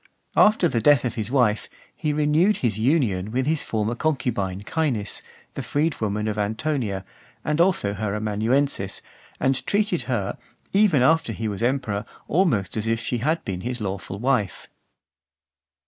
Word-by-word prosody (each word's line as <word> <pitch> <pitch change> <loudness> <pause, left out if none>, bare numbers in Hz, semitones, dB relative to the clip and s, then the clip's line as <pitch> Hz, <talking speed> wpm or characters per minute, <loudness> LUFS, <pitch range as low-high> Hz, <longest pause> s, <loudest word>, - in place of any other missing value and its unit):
After 210 -4 +5
the 115 -7 0
death 145 0 +5
of 120 - -1
his 110 -3 -3
wife, 120 -6 +2 0.3
he 150 - -1
renewed 150 +7 +3
his 110 -2 0
union 110 - +1
with 130 +3 0
his 155 +1 +1
former 110 +1 -1
concubine 120 -10 -1
Caenis, 120 -7 -1 0.3
the - - -4
freedwoman 110 -9 -1
of 105 -1 -2
Antonia, 110 -2 -1 0.4
and 150 +2 +2
also 170 - +2
her 105 0 -2
amanuensis, 110 +1 0 0.4
and 135 0 +1
treated 205 -4 +1
her, 105 -6 -1 0.3
even 195 -10 +4
after 160 -4 +3
he 110 +1 -3
was 105 0 -4
emperor, 115 -5 0 0.2
almost 140 - +1
as 110 +1 -2
if 115 0 +1
she 120 +1 -2
had 155 +7 0
been 90 -2 -3
his 125 +3 -3
lawful 95 -2 -4
wife. 120 -3 0
120 Hz, 150 wpm, -24 LUFS, 105-150 Hz, 0.4 s, After